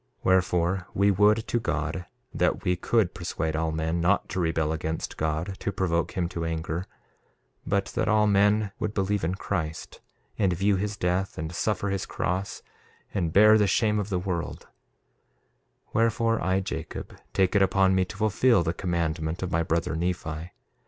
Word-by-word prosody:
1:8 - - -45 0.2
Wherefore, 90 0 +2
we 100 +1 +4
would 105 +3 +3
to 120 - +1
God 80 -2 -2 0.3
that - - +1
we 90 - +2
could 100 +1 +1
persuade 80 -2 -3
all 80 0 0
men 80 +2 -1
not 95 +4 +2
to 95 - -3
rebel 80 -2 0
against 80 0 -3
God, 80 +5 -2
to 100 - -2
provoke 85 -3 0
him 90 -2 +1
to 85 -2 -4
anger, 80 +2 -3 0.8
but 100 0 +1
that - - 0
all 110 -1 +4
men 105 0 +3
would 105 0 -2
believe 100 -1 0
in 85 +3 0
Christ, 80 -5 -4 0.4
and 95 -4 +3
view 100 +3 +2
his 100 +2 -2
death, 90 +2 -1
and 80 +2 -4
suffer 100 +2 -1
his 95 -1 -2
cross 95 +2 -3 0.5
and 85 -5 0
bear 105 +4 +7
the 105 - +3
shame 105 +2 +2
of 105 0 -3
the 95 - 0
world; 90 -2 -3 1.3
wherefore, 115 0 +2
I, 95 +1 +1
Jacob, 80 -4 -6 0.2
take 95 +1 +1
it 100 - +5
upon 95 0 +4
me 95 0 +3
to - - -10
fulfil 110 -1 +3
the 80 - -1
commandment 85 -2 -2
of 90 - -3
my 85 - +2
brother 80 0 -1
Nephi. 85 -1 -3
95 Hz, 170 wpm, -26 LUFS, 85-100 Hz, 1.3 s, bear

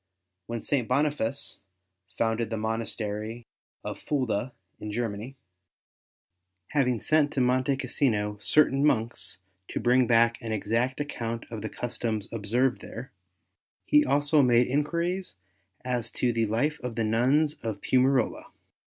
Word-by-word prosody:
When 115 -1 -4
St. 130 -6 0
Boniface 140 -1 -1 0.6
founded 115 0 0
the 115 - -2
monastery 110 0 -3 0.4
of - - -5
Fulda 130 -4 -1 0.3
in 105 - -5
Germany, 115 +2 -4 1.3
having 125 -5 +1
sent 150 +2 +2
to - - -1
Monte 130 +2 +2
Cassino 110 -6 0
certain 140 0 +4
monks 120 -9 +1 0.3
to - - -3
bring 125 0 +3
back 115 +1 +3
an 115 -2 -3
exact 115 +6 0
account 115 -5 -4
of 110 -2 -5
the 110 - -4
customs 115 -3 -3
ob 105 -3 -5
served 125 +4 +2
there, 125 +4 -8 0.7
he 295 0 +5
also 145 - +3
made 120 -2 +4
enquiries 170 - -1 0.5
as 120 -2 0
to 120 -1 +1
the 115 -1 +1
life 145 +8 0
of 125 -2 -5
the 115 - 0
nuns 130 +8 +2
of 110 -3 -4
Piumarola. 130 -1 +2
120 Hz, 135 wpm, -27 LUFS, 115-135 Hz, 1.3 s, he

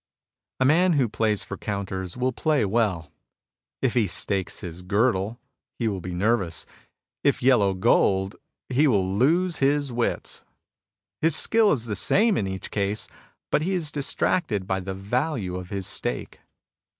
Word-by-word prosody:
A 130 - +3
man 175 +6 +4
who 135 -5 +2
plays 110 -1 0
for - - -7
counters 95 -2 -4
will 130 +1 0
play 150 +1 +1
well. 95 -8 0 0.7
If 130 - +2
he 115 -5 +2
stakes 95 -1 -2
his 85 0 -7
girdle,^ 100 +2 0 0.4
he 115 - -1
will 100 -4 -2
be 90 0 -5
nervous; 100 -3 0 0.6
if 140 -2 +1
yellow 105 -7 +4
gold, 95 -1 +2 0.3
he 135 +4 +2
wiU 95 -6 +1
lose 170 +6 +2
his 140 0 +1
wits. 120 0 -2 0.8
His 160 -1 +4
skill 225 -2 +5
is 120 -5 0
the 105 -3 -3
same 215 - +3
in 100 - -1
each 95 0 -6
case, 100 +1 -1 0.4
but - - +2
he 190 +4 0
is 160 -5 -1
distracted 135 - 0
by 95 0 -1
the 95 0 -5
value 105 - -2
of 90 0 -6
his 100 -2 -4
stake. - - -3
110 Hz, 155 wpm, -25 LUFS, 95-140 Hz, 0.8 s, skill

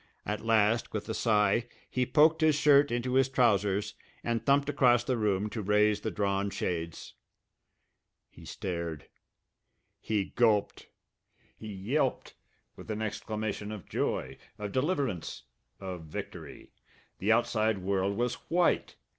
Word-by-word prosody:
At 105 0 -3
last, 115 0 +2
with 110 - -4
a - - -1
sigh, 110 +1 +2 0.2
he 125 -1 -1
poked 155 +5 +4
his 155 -1 +4
shirt 145 -1 +5
into 120 +1 -1
his 135 0 +3
trousers 105 -6 +2 0.3
and 115 -1 -1
thumped 140 0 +3
across 125 -4 +3
the 130 - 0
room 105 -3 0
to 110 - -4
raise 105 +1 +2
the - - -2
drawn 100 -1 -1
shades. 85 -4 -4 1.2
He - - -15
stared. 85 -5 -5 0.9
He 105 -3 -1
gulped. 110 -4 +2 0.7
He 110 -1 -8
yelped 125 +8 -1 0.4
with - - -12
an 110 0 -2
exclamation 105 0 -4
of 105 -5 -8
joy, - - -2 0.2
of 105 -1 -5
deliverance, 130 - -2 0.4
of 90 -4 -6
victory! 75 - -8 0.5
The 105 +4 +1
outside 110 -2 +2
world 95 +1 -1
was 120 0 0 0.2
white! 175 0 +1
110 Hz, 130 wpm, -30 LUFS, 100-125 Hz, 1.2 s, shirt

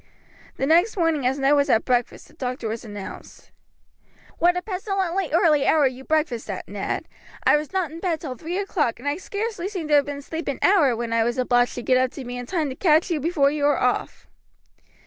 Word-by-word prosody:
The 270 - 0
next 345 +9 +3
morning, 325 -7 +1
as 265 +2 0
Ned 275 +1 +3
was 285 -1 +2
at 220 - +3
breakfast, 245 -2 -1
the - - -21
doctor 250 -5 -4
was 220 +1 -4
announced. 205 -3 -10 0.9
"What 350 +1 +3
a 360 - -3
pestilently 380 -3 -2
early 305 -3 +3
hour 305 -3 +4
you 260 0 -2
breakfast 300 -8 -1
at, 190 - -5
Ned! 200 0 -4 0.4
I - - +5
was 300 0 -2
not 375 -5 -1
in 325 - -8
bed 335 -3 -1
till 275 -6 -5
three 330 +8 -5
o'clock, 350 - -1
and 260 - -8
I 290 +2 0
scarcely 405 -1 -4
seemed 355 -7 -5
to 295 - +5
have 285 - +3
been 285 -1 -4
asleep 320 +3 -6
an 280 - -2
hour 310 -11 +4
when 230 0 -3
I 230 0 +3
was 240 +2 -1
obliged 245 -1 +2
to 245 - -5
get 255 - +3
up 255 0 +2
to 270 - -8
be 245 +1 -6
in 245 0 -6
time 320 -6 -1
to 260 - -6
catch 320 +2 +3
you 320 - 0
before 290 -2 +2
you 295 -1 -3
were 290 - +3
off." - - -1
295 Hz, 225 wpm, -23 LUFS, 255-340 Hz, 0.9 s, I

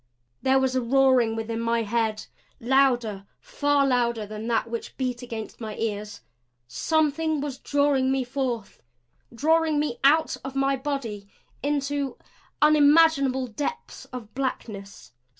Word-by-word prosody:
There 265 0 +3
was 265 -1 +1
a 255 - +2
roaring 255 -2 +3
within 225 0 -3
my 230 0 0
head 220 0 -1 0.3
louder, 240 -6 +1
far 285 -1 +1
louder, 235 -4 +1
than 215 +2 -7
that 230 -1 +1
which 230 0 -6
beat 250 -2 -2
against 230 -2 -7
my 215 -2 -5
ears. 210 -2 -4 0.5
Something 310 - 0
was 275 -2 -4
drawing 285 -2 +1
me 265 -1 +1
forth; 245 -4 -4 0.5
drawing 315 +5 +2
me 290 -5 -1
out 310 +3 +4
of 270 0 -7
my 275 0 +2
body 255 -8 -4 0.3
into 285 -1 -1 0.5
unimaginable 295 -3 +5
depths 290 - -5
of 235 -4 -9
blackness. 205 - -5
260 Hz, 130 wpm, -25 LUFS, 225-285 Hz, 0.5 s, unimaginable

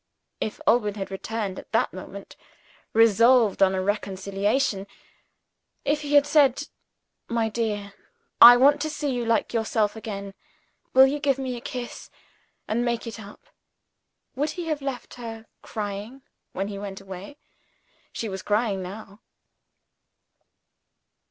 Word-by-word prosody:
If 215 - -4
Alban 210 -3 +3
had 195 -2 -5
returned 200 0 -4
at - - -14
that - - +1
moment, - - -9 0.6
resolved 230 0 +4
on 190 0 +5
a 185 - -1
reconciliation 200 +2 -1 1.0
if 295 +1 +1
he 290 -1 -1
had 285 0 +7
said, 285 -2 +3 0.6
"My 230 -1 0
dear, 210 -3 -3 0.5
I 245 +1 +12
want 285 +3 +5
to 310 - -1
see 290 -2 -2
you 245 -1 -2
like 230 +1 +1
yourself 220 -2 0
again; 200 -3 -6 0.6
will 265 0 +9
you 285 +2 -1
give 275 -2 +1
me 260 -2 -3
a 240 - -8
kiss, 250 -3 -7 0.6
and 235 +3 0
make 235 -1 -1
it 230 -1 -7
up" 205 -1 -12 0.9
would 290 +4 0
he 350 +3 -5
have 300 -2 -1
left 270 -3 -5
her 225 -1 -7 0.2
crying, 210 +5 -6 0.3
when 195 +1 -3
he 200 -1 -6
went 200 -1 -6
away? 195 +7 -10 0.7
She 230 - -4
was 190 -2 -5
crying 210 -2 0
now. 200 +2 -9
225 Hz, 140 wpm, -25 LUFS, 200-260 Hz, 1.0 s, I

